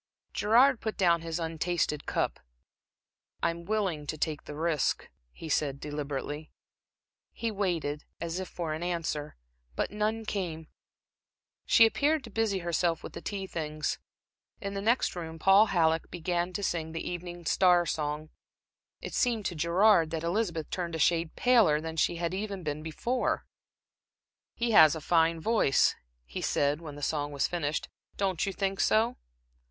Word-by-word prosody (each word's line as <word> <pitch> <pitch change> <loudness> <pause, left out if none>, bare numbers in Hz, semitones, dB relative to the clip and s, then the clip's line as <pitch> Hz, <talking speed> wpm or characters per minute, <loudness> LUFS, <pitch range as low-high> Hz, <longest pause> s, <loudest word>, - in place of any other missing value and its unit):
Gerard 245 +4 +4
put 220 -1 -3
down 170 -4 +3
his 165 0 -3
untasted 165 -2 -1
cup. - - -1 1.0
"I'm 170 0 -1
willing 190 -8 -1
to 155 - -3
take 155 0 -2
the 150 - -7
risk," 160 -2 0 0.2
he 165 - -9
said, 145 -2 0
deliberately. 150 +1 -4 0.8
He 230 -1 -2
waited, 170 -8 -2
as 170 +1 -3
if 185 - -4
for 165 -3 -4
an 155 - -5
answer, 165 -4 -3 0.4
but - - -1
none 215 +2 -1
came. 165 -7 -4 1.0
She 230 - +7
appeared 290 +6 +2
to 230 - -10
busy 220 -2 +1
herself 170 -1 0
with - - -8
the - - -7
tea 195 -2 -4
things. 155 -4 -3 0.6
In 200 0 -4
the 195 - -3
next 230 +1 +2
room 165 -2 -6
Paul 195 +6 +6
Halleck 165 -3 +2
began 175 +1 -2
to 200 - -3
sing 160 -3 -2
the 165 - -4
Evening 175 -1 -6
Star 180 0 +4
song. 155 0 -3 0.7
It - - -6
seemed 230 -4 +1
to 175 - -2
Gerard 170 +2 +4
that 160 0 -3
Elizabeth 170 -3 -1
turned 170 -3 -3
a - - -1
shade 165 +1 +1
paler 225 -12 +4
than 160 +1 -5
she 165 - +2
had 170 0 -2
been 185 -7 -3
before. 235 +11 -1 1.1
"He 235 0 0
has 160 -8 +8
a - - -4
fine 165 +1 +2
voice," 215 -7 +3 0.3
he - - -6
said, 145 +2 +1
when 150 -3 -8
the 145 - -8
song 145 -1 -1
was 140 -1 0
finished. 155 -4 -2 0.3
"Don't 190 -2 0
you - - 0
think 195 0 -2
so?" 230 +3 +3
170 Hz, 160 wpm, -29 LUFS, 155-200 Hz, 1.1 s, has